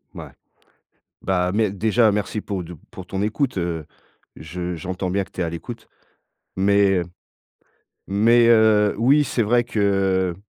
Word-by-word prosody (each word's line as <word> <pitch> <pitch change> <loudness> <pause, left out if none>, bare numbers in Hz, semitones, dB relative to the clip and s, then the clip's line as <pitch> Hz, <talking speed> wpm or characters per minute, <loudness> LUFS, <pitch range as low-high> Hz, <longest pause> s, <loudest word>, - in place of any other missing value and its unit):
Ouais. - - -9 0.9
Bah, 90 -1 0
mais 110 -1 +1
déjà 110 +3 +2
merci 105 +1 -2
pour 100 -3 -4
de 85 0 -10
pour 90 - -10
ton 95 +2 -3
écoute, 115 +2 -1
heu, 85 -3 -3 0.5
je 90 +3 -6
j'entends 90 +3 -4
bien 100 +1 0
que - - -23
tu - - -8
es - - +1
à 85 - -3
l'écoute, 115 +7 -8 0.7
mais 100 0 +3
heu, - - -1 1.1
mais 115 +4 +4
heu, 110 -2 +4
oui 135 +6 +4
c'est 120 -2 -1
vrai 120 +3 +2
que 95 -4 0
100 Hz, 155 wpm, -22 LUFS, 90-110 Hz, 1.1 s, mais